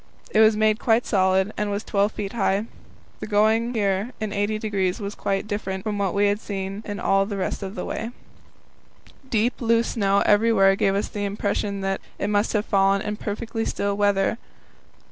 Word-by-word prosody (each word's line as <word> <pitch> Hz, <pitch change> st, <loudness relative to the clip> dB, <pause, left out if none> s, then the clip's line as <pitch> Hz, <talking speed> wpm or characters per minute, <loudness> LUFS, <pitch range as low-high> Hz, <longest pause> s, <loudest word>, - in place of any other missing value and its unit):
It 215 Hz, -, +2 dB
was 220 Hz, -1 st, +6 dB
made 215 Hz, 0 st, +2 dB
quite 230 Hz, 0 st, +2 dB
solid, 190 Hz, 0 st, +2 dB
and 210 Hz, 0 st, -1 dB
was 205 Hz, +1 st, -2 dB
12 205 Hz, 0 st, +1 dB
feet 200 Hz, -2 st, -5 dB
high. 200 Hz, -2 st, +1 dB, 0.5 s
The -, -, -6 dB
going 220 Hz, +3 st, +2 dB
here 200 Hz, +2 st, 0 dB
in 215 Hz, -2 st, -3 dB
80° 205 Hz, -2 st, -1 dB
was 200 Hz, -1 st, -4 dB
quite 195 Hz, -1 st, -2 dB
different 195 Hz, -3 st, -4 dB
from 210 Hz, -2 st, -2 dB
what 195 Hz, -2 st, 0 dB
we 205 Hz, +1 st, +3 dB
had 205 Hz, +1 st, +1 dB
had 200 Hz, +1 st, -5 dB
all 195 Hz, 0 st, +2 dB
the 205 Hz, -2 st, -4 dB
rest 190 Hz, -, -2 dB
of 195 Hz, +1 st, -6 dB
the -, -, -4 dB
way. 225 Hz, -, -4 dB, 1.2 s
Deep, 230 Hz, +2 st, 0 dB
loose 230 Hz, 0 st, +2 dB
snow 200 Hz, -2 st, +2 dB
every 220 Hz, +3 st, +4 dB
where 195 Hz, -3 st, +5 dB
gave 195 Hz, 0 st, +1 dB
us 200 Hz, -, 0 dB
the 205 Hz, -, -4 dB
impression 200 Hz, 0 st, -2 dB
that 195 Hz, 0 st, -2 dB, 0.2 s
it 205 Hz, -, -2 dB
must 205 Hz, +1 st, +1 dB
have 210 Hz, -1 st, 0 dB
fallen 195 Hz, 0 st, +2 dB
in 210 Hz, -, -3 dB
perfectly 225 Hz, +2 st, -4 dB
still 200 Hz, -2 st, -1 dB
weather. 205 Hz, +2 st, +1 dB
205 Hz, 185 wpm, -24 LUFS, 195-215 Hz, 1.2 s, was